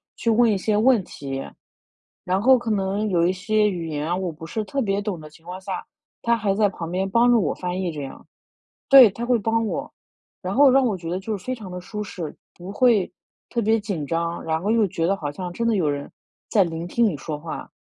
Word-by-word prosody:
去 230 - -1
问 230 +1 +4
一 205 - +2
些 210 +2 0
问 235 -1 +4
题。 135 -4 -6 0.8
然 185 +1 0
后 260 +2 +6
可 235 -1 -5
能 200 +1 0
有 170 -2 +2
一 185 - +1
些 210 +2 +1
语 170 -3 -4
言 150 0 -3
啊， 175 - 0
我 185 -2 -2
不 160 +1 -10
是 215 +6 -3
特 275 +6 -4
别 200 -2 0
懂 200 -5 -3
的 155 0 -11
情 160 +2 -20
况 180 +1 -7
下， 190 -1 -4 0.4
他 235 0 +2
还 205 -3 0
在 210 -1 +3
旁 165 -3 -6
边 190 +2 -1
帮 235 +4 +4
助 235 -2 +5
我 150 - 0
翻 180 +1 -3
译 180 - -1
这 150 -2 -6
样。 135 - -9 0.6
对， 265 -5 +10
他 230 +5 -5
会 245 0 +3
帮 225 +2 0
我， - - -4 0.5
然 185 +1 -3
后 280 0 +7
让 270 0 +4
我 215 -5 +1
觉 165 -1 -7
得 180 +2 -2
就 215 +2 -3
非 255 +7 -4
常 210 -6 -9
的 180 0 -6
舒 210 +3 -5
适， 175 -6 -6 0.2
不 180 +2 -9
会 225 -3 +3 0.4
特 240 - -2
别 225 +1 +2
紧 195 -8 -4
张， 170 +1 -2
然 160 0 -1
后 205 - -2
又 225 -2 +3
觉 165 -2 -2
得 195 +2 +1
好 145 -4 -4
像 180 +3 -6
真 230 +5 -2
的 230 - +2
有 170 -7 +1
人 145 0 -3 0.4
在 200 -4 +4
聆 165 0 -4
听 235 +6 +2
你 190 -9 0
说 150 +2 -5
话。 160 +1 -7
195 Hz, 265 characters per minute, -23 LUFS, 170-225 Hz, 0.8 s, 对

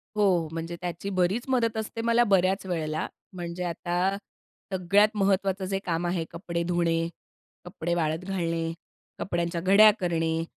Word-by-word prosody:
हो. 185 -6 +3
म्हणजे 165 +1 -4
त्याची 180 +2 -4
बरीच 190 +5 +1
मदत 230 -4 +1
असते 220 +1 -4
मला 235 +1 +4
बऱ्याच 190 +1 +2
वेळेला. 155 -3 -2 0.3
म्हणजे 175 0 -5
आता 175 +3 -1 0.6
सगळ्यात 200 +4 +4
महत्त्वाचं 195 -1 +1
जे 195 0 -1
काम 175 0 -1
आहे 175 -2 0
कपडे 170 -1 -3
धुणे, 165 -1 +1 0.6
कपडे 175 -2 -3
वाळत 160 +1 -1
घालणे, 165 -3 -1 0.5
कपड्यांच्या 170 -2 -2
घड्या 205 +4 +7
करणे 165 -2 0
180 Hz, 135 wpm, -27 LUFS, 170-195 Hz, 0.6 s, घड्या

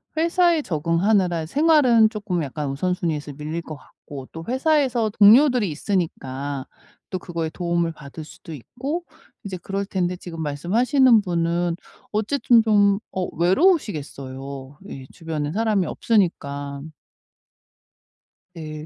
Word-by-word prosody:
회사에 335 0 +3
적응하느라 170 - +1
생활은 270 - +4
쪼끔 205 -6 -3
약간 145 +1 -4
우선순위에서 155 -1 -2
밀릴 155 +4 -5
것 155 - -8
같고 140 -1 -12
또 165 0 -8
회사에서 260 -4 +1
동료들이 225 +2 +5
있으니까 145 -6 -3 0.4
또 185 - -3
그거에 165 -2 -4
도움을 170 0 -1
받을 150 +1 -10
수도 160 +1 -12
있고 270 - -5 0.4
이제 195 -2 -5
그럴 195 +3 -4
텐데 180 -2 -1
지금 165 -3 -8
말씀하시는 225 - +3
분은 170 -2 -1 0.4
어쨌든 230 +2 +3
좀 205 -2 +3
어 185 -1 -2
외로우시겠어요 145 - -1
예 135 -1 -8
주변에 155 -3 -4
사람이 215 -3 +1
없으니까. 145 -11 -1 1.7
네. 155 -2 -7
175 Hz, 290 characters per minute, -22 LUFS, 155-220 Hz, 1.7 s, 동료들이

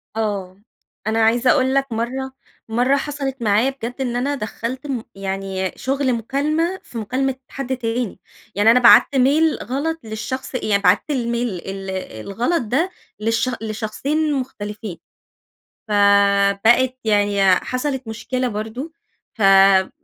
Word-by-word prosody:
آه، 200 -3 -3 0.5
أنا 220 +1 +1
عايزة 240 +3 +3
أقول 260 -2 +2
لَك 275 -2 +1
مرّة 255 +4 -3 0.4
مرّة 245 +5 +2
حصلت 280 -2 -4
معايا 220 +3 +3
بجد 245 -3 -6
إن 245 -2 -2
أنا 275 +4 0
دخّلت 255 +4 -5
م 250 -5 -3
يعني 195 -1 -3
شغل 270 -1 0
مكالمة، 300 - -1
في 240 - -10
مكالمة 255 +5 -1
حد 265 -1 -4
تاني، 230 -3 -3 0.4
يعني 205 +3 +5
أنا 245 - +5
بعت 250 +3 +7
mail 290 +5 +3
غلط 320 +6 -2
للشخص 255 +5 -5
يعني 205 -5 +1
بعت 185 +2 +5
الmail - - +1 0.5
ال 195 0 -6 0.4
الغلط 245 - 0
ده 275 - 0 0.3
للش 225 +3 0
لشخصين 245 +8 -2
مختلفين. 210 -7 -5 0.9
فبقت 200 +4 +4
يعني 205 -2 +2
حصلت 255 +4 -3
مشكلة 250 +3 -2
برضو، 225 +8 -5 0.4
فما 195 -2 +5
240 Hz, 125 wpm, -20 LUFS, 205-270 Hz, 0.9 s, بعت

